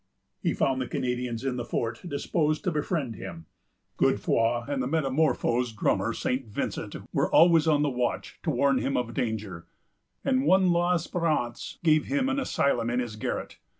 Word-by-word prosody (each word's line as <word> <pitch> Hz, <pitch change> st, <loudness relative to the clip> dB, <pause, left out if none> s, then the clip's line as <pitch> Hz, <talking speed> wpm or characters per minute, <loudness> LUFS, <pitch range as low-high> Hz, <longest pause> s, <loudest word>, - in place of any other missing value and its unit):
He -, -, 0 dB
found 130 Hz, -1 st, +1 dB
the 125 Hz, -, -2 dB
Canadians 125 Hz, -1 st, -2 dB
in 130 Hz, -2 st, -1 dB
the 120 Hz, -, -2 dB
fort 115 Hz, -1 st, -3 dB
disposed 155 Hz, 0 st, 0 dB
to 180 Hz, -, 0 dB
befriend 150 Hz, -, -2 dB
him. 80 Hz, -2 st, -8 dB, 0.5 s
Godefroy 115 Hz, +1 st, +2 dB
and 140 Hz, -2 st, -1 dB
the 125 Hz, -, -1 dB
metamorphosed 135 Hz, -5 st, +1 dB
drummer, -, -, +1 dB
St. 130 Hz, -1 st, -2 dB
Vincent, 105 Hz, -, -4 dB, 0.2 s
were -, -, +1 dB
always 165 Hz, -1 st, +6 dB
on 150 Hz, -2 st, +4 dB
the 145 Hz, -, +2 dB
watch 125 Hz, -1 st, -2 dB
to 170 Hz, -, -2 dB
warn 140 Hz, -1 st, +2 dB
him 135 Hz, -, -1 dB
of 120 Hz, -2 st, -2 dB
danger; 105 Hz, -8 st, -3 dB, 0.6 s
and 130 Hz, +1 st, +2 dB
one 185 Hz, 0 st, +5 dB
l'Esperance 170 Hz, -6 st, 0 dB
gave 155 Hz, -2 st, +4 dB
him 275 Hz, -1 st, 0 dB
an 270 Hz, +1 st, 0 dB
asylum 120 Hz, -, +1 dB
in 120 Hz, +1 st, 0 dB
his 120 Hz, -4 st, -3 dB
garret. 110 Hz, -, -4 dB
135 Hz, 165 wpm, -27 LUFS, 120-160 Hz, 0.6 s, always